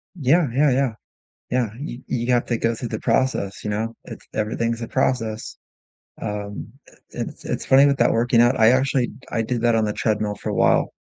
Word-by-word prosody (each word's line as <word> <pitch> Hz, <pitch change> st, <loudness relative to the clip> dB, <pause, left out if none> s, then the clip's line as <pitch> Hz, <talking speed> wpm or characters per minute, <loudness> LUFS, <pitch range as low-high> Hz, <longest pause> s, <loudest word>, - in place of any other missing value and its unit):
Yeah, 155 Hz, +1 st, +3 dB
yeah, 140 Hz, +1 st, +3 dB
yeah, 130 Hz, -2 st, +1 dB, 0.6 s
yeah, 125 Hz, -3 st, +1 dB
you 130 Hz, -4 st, -6 dB
you 120 Hz, 0 st, -1 dB
have 120 Hz, -, +2 dB
to 120 Hz, -, 0 dB
go 115 Hz, +1 st, 0 dB
through 120 Hz, 0 st, -5 dB
the 110 Hz, -, -4 dB
process, 115 Hz, -7 st, 0 dB
you 105 Hz, -, -3 dB
know? 110 Hz, +2 st, -2 dB
It's -, -, -11 dB
everything's 115 Hz, +2 st, -1 dB
a 115 Hz, -, -4 dB
process. 115 Hz, -4 st, -1 dB, 0.6 s
Um, 105 Hz, 0 st, -5 dB, 0.2 s
i -, -, -19 dB, 0.2 s
it's -, -, -6 dB
it's -, -, -3 dB
funny 135 Hz, +2 st, +6 dB
with 140 Hz, -1 st, +2 dB
that -, -, +4 dB
working 115 Hz, +1 st, +3 dB
out, 120 Hz, +2 st, +3 dB
I 110 Hz, 0 st, +6 dB
actually 130 Hz, -1 st, +2 dB, 0.2 s
I 115 Hz, -, 0 dB
did 120 Hz, +1 st, -2 dB
that 120 Hz, -1 st, +3 dB
on 110 Hz, -1 st, +2 dB
the 105 Hz, -, -1 dB
treadmill 105 Hz, -1 st, -1 dB
for -, -, -5 dB
a -, -, -2 dB
while. -, -, +3 dB
120 Hz, 205 wpm, -22 LUFS, 110-130 Hz, 0.6 s, funny